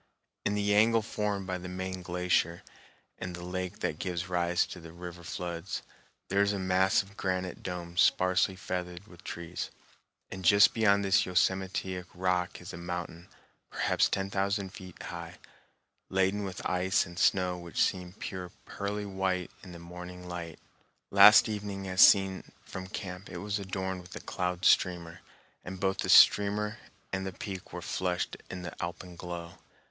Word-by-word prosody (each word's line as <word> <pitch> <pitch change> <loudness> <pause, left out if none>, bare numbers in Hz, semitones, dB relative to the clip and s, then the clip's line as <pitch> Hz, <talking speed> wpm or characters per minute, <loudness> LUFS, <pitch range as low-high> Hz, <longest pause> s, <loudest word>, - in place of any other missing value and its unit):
In 105 - 0
the 105 0 +2
angle 110 +2 +4
formed 105 -2 -2
by 90 -1 -3
the 90 0 -7
main 95 0 -4
glacier 90 -1 0 0.6
and 90 -1 -5
the 90 - -8
lake 90 +2 -4
that 75 - -2
gives 90 -1 -3
rise 90 -1 +2
to - - -9
the 80 -1 -11
river 85 0 -9
floods, 85 +1 -4 0.4
there 100 +1 +2
is 100 0 +3
a - - -1
massive 95 +1 +2
granite 95 -2 -2
dome 85 -1 -5
sparsely 95 0 +3
feathered 90 0 -5
with 90 -4 -16
trees, 85 +1 -5 0.6
and 95 -1 -6
just 100 +4 +7
beyond 100 -3 +3
this 95 -1 +3
yosemitic 95 0 0
rock 90 -1 0
is 90 - -9
a - - -6
mountain, 85 0 -5 0.4
perhaps - - +2
ten 95 0 -1
thousand 100 -1 -1
feet 90 -2 -11
high, 85 0 -7 0.7
laden 95 +2 +1
with 95 -1 -4
ice 90 +1 +2
and 85 0 -8
snow 90 -1 +3
which 85 -1 -6
seemed 90 0 -2
pure 90 -2 -5 0.2
pearly 105 +1 -3
white 95 -2 -1
in 95 - -11
the 85 - -9
morning 90 +1 -9
light. 85 -2 -6 0.5
Last 100 +3 +9
evening 100 -2 -4
as 95 0 +2
seen 95 -1 +6
from 95 0 -7
camp 95 -1 -6
it - - -6
was 105 0 -2
adorned 95 -1 -3
with 90 +1 -12
a - - -5
cloud 90 0 -3
streamer, 85 -1 +3 0.4
and 95 +1 -7
both 95 0 0
the - - -1
streamer 105 +1 +6 0.3
and 95 0 -1
the 95 - -3
peak 95 0 -7
were 90 - -6
flushed 90 +1 -1
in 90 -1 -6
the 85 - -6
alpenglow. 85 -1 -7
90 Hz, 165 wpm, -30 LUFS, 90-95 Hz, 0.7 s, Last